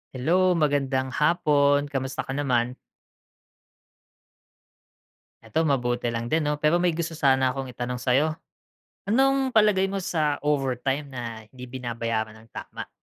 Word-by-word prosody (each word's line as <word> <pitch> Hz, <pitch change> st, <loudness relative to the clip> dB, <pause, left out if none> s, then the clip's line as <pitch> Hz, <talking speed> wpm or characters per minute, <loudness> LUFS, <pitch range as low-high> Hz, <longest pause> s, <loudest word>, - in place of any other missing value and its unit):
Hello 180 Hz, +7 st, +2 dB
magandang 135 Hz, -4 st, 0 dB
hapon, 145 Hz, -2 st, +3 dB
kamusta 130 Hz, -1 st, -3 dB
ka -, -, -7 dB
naman? 125 Hz, -3 st, 0 dB, 2.7 s
Eto, 160 Hz, -, 0 dB
mabuti 120 Hz, -4 st, 0 dB
lang 115 Hz, 0 st, -3 dB
din 160 Hz, +4 st, +2 dB
'no, 150 Hz, -, -1 dB
pero 155 Hz, +4 st, +2 dB
may 180 Hz, -, +3 dB
gusto 170 Hz, -1 st, -3 dB
sana 130 Hz, -4 st, +2 dB
akong 135 Hz, -1 st, -5 dB
itanong 125 Hz, 0 st, -5 dB
sa'yo. 140 Hz, +5 st, +2 dB, 0.7 s
Anong 270 Hz, +4 st, +3 dB
palagay 210 Hz, -3 st, +4 dB
mo 195 Hz, -, -3 dB
sa 155 Hz, -4 st, 0 dB
overtime 135 Hz, -1 st, 0 dB
na 130 Hz, -3 st, -7 dB, 0.3 s
hindi 125 Hz, +2 st, -12 dB
binabayaran 115 Hz, -3 st, -3 dB
ng 110 Hz, +1 st, -18 dB
tama? -, -, -8 dB
140 Hz, 130 wpm, -25 LUFS, 125-155 Hz, 2.7 s, palagay